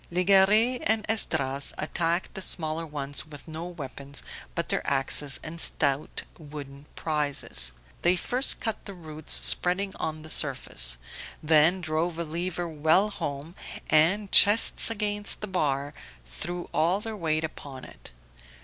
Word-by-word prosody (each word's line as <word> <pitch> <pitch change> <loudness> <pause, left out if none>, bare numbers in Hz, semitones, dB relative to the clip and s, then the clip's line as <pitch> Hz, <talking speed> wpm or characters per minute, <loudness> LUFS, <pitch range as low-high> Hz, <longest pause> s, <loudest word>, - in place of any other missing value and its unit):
Legare 200 +7 +3
and 220 0 +1
Esdras 140 -10 +1
attacked 170 +3 -2
the 190 - -6
smaller 160 -2 0
ones 145 -1 -5
with 145 -1 -13
no 160 +1 -7
weapons 140 -4 -7 0.3
but - - -3
their - - -1
axes 135 0 +4
and 165 +1 -6
stout 140 0 0 0.2
wooden 145 -2 -11
Prizes. 145 - +1 0.3
They 175 +1 +2
first 250 +9 +1
cut 225 - -4
the 200 - -8
roots 155 -3 -10
spreading 190 +2 0
on 155 -1 -5
the 155 - -11
surface, - - +1 0.5
then 160 +4 +3
drove 160 +1 -2
a 170 - -2
lever 170 +2 -4
well 160 +6 +1
home, 160 -4 -6 0.4
and, 185 +7 +3
chests 210 +3 +7
against 205 -2 -1
the 210 - -5
bar, 145 -6 -2 0.3
threw 175 - -6
all 175 +5 +1
their 220 +1 -6
weight 160 -4 -1
upon 140 -4 -8
it. - - -14
160 Hz, 140 wpm, -26 LUFS, 145-185 Hz, 0.5 s, chests